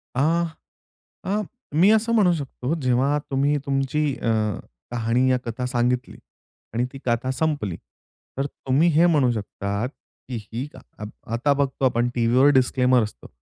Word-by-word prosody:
अ, 130 Hz, -, +1 dB, 1.0 s
अ, 205 Hz, +2 st, 0 dB, 0.3 s
मी 180 Hz, +7 st, +5 dB
असं 220 Hz, +1 st, +3 dB
म्हणू 200 Hz, -6 st, +4 dB
शकतो, 140 Hz, -1 st, -3 dB
जेव्हा 130 Hz, +3 st, +2 dB
तुम्ही 140 Hz, +2 st, +2 dB
तुमची 135 Hz, +2 st, 0 dB
अ, -, -, -6 dB, 0.6 s
कहाणी 120 Hz, +2 st, +1 dB
या 130 Hz, -, +3 dB
कथा 120 Hz, +2 st, -3 dB
सांगितली 125 Hz, 0 st, -1 dB, 0.6 s
आणि 120 Hz, +2 st, +1 dB
ती 135 Hz, -, -8 dB
कथा 120 Hz, +1 st, 0 dB
संपली, 130 Hz, -, -1 dB, 0.6 s
तर 135 Hz, +1 st, 0 dB
तुम्ही 140 Hz, +4 st, +1 dB
हे 165 Hz, +2 st, +5 dB
म्हणू 145 Hz, -7 st, +3 dB
शकतात, 100 Hz, 0 st, -3 dB, 0.4 s
की 125 Hz, -, -4 dB, 0.2 s
ही 120 Hz, +5 st, -3 dB
क -, -, -11 dB, 0.5 s
आता 120 Hz, +5 st, +2 dB
बघतो 140 Hz, -1 st, -1 dB
आपण 120 Hz, -1 st, +2 dB
टीव्हीवर 120 Hz, +3 st, +4 dB
डिस्क्लेमर 125 Hz, -1 st, +3 dB
असतं. 105 Hz, -, -7 dB
130 Hz, 145 wpm, -23 LUFS, 120-145 Hz, 1.0 s, मी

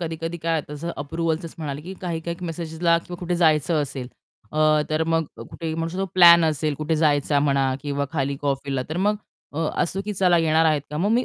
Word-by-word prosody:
कधी-कधी 165 Hz, 0 st, -4 dB
काय 165 Hz, -1 st, 0 dB
तसं 155 Hz, +3 st, -5 dB
अप्रूव्हलचंच 160 Hz, +2 st, -3 dB
म्हणाले 145 Hz, -2 st, -4 dB
की 185 Hz, +3 st, -7 dB
काही-काही 170 Hz, 0 st, -4 dB
मेसेजेसला 165 Hz, +1 st, 0 dB
किंवा 175 Hz, +1 st, -9 dB
कुठे 175 Hz, 0 st, -1 dB
जायचं 155 Hz, -2 st, +3 dB
असेल 135 Hz, -3 st, -6 dB, 0.4 s
अ, 155 Hz, -, -3 dB, 0.3 s
तर 155 Hz, +1 st, +1 dB
मग 165 Hz, 0 st, +1 dB
कुठे 165 Hz, -1 st, -6 dB
म्हणू 165 Hz, 0 st, -2 dB
शकू 180 Hz, +3 st, -6 dB
तो 195 Hz, -, +1 dB
प्लॅन 170 Hz, -2 st, +8 dB
असेल, 155 Hz, -1 st, 0 dB
कुठे 155 Hz, +2 st, -1 dB
जायचा 145 Hz, -2 st, +2 dB
म्हणा 135 Hz, -2 st, +2 dB
किंवा 140 Hz, -1 st, -1 dB
खाली 140 Hz, -2 st, -1 dB
कॉफीला 135 Hz, -1 st, -1 dB
तर 160 Hz, -, -4 dB
मग 205 Hz, +3 st, +2 dB, 0.4 s
अ, 150 Hz, -, -5 dB, 0.2 s
असतो 180 Hz, +3 st, -2 dB
की 210 Hz, -, -3 dB
"चला 180 Hz, -2 st, +3 dB
येणार 160 Hz, 0 st, +3 dB
आहेत 155 Hz, -2 st, +3 dB
का?" 150 Hz, -, -4 dB
मग 200 Hz, +6 st, +1 dB
मी 245 Hz, +2 st, +3 dB
160 Hz, 205 wpm, -23 LUFS, 150-170 Hz, 0.4 s, प्लॅन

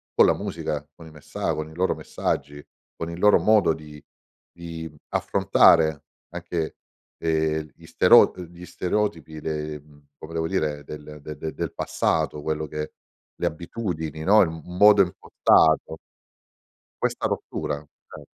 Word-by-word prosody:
con -, -, +7 dB
la -, -, +4 dB
musica, 75 Hz, -1 st, -4 dB
con 80 Hz, -, -13 dB
i 80 Hz, -, -12 dB
messa 75 Hz, -1 st, -4 dB
con 80 Hz, 0 st, -4 dB
i 80 Hz, -, -14 dB
loro 95 Hz, +2 st, +1 dB
messaggi, 75 Hz, 0 st, -3 dB, 0.4 s
con 85 Hz, 0 st, -5 dB
il 85 Hz, -, -7 dB
loro 105 Hz, +2 st, +6 dB
modo 105 Hz, -6 st, +4 dB
di 75 Hz, -2 st, -12 dB, 0.5 s
di 85 Hz, -2 st, -8 dB, 0.2 s
affrontare 80 Hz, -2 st, +3 dB, 0.2 s
anche, 85 Hz, -2 st, -4 dB, 0.4 s
ehm, 80 Hz, -1 st, 0 dB
gli -, -, -17 dB
stero -, -, +6 dB
uhm, 90 Hz, -1 st, -7 dB
gli 85 Hz, +1 st, -12 dB
stereotipi 90 Hz, -3 st, -2 dB
le 75 Hz, -1 st, -4 dB
mhmm, 75 Hz, 0 st, -21 dB
come 80 Hz, +1 st, -10 dB
devo 80 Hz, 0 st, -1 dB
dire, 75 Hz, -5 st, -1 dB
del 75 Hz, +1 st, -9 dB
de 75 Hz, 0 st, -8 dB
de 80 Hz, +1 st, -5 dB
del -, -, -4 dB
passato, 75 Hz, -, -1 dB
quello 80 Hz, +1 st, -2 dB
che 75 Hz, +1 st, -6 dB, 0.4 s
le -, -, -3 dB
abitudini 80 Hz, -3 st, -4 dB
no, 105 Hz, +5 st, +6 dB
il 85 Hz, -, +3 dB
m 80 Hz, 0 st, -8 dB
modo 100 Hz, +3 st, +6 dB
impostato. 80 Hz, -3 st, +2 dB, 1.0 s
Questa -, -, 0 dB
rottura, 75 Hz, -, -3 dB
ce -, -, -15 dB
80 Hz, 150 wpm, -24 LUFS, 75-85 Hz, 1.0 s, con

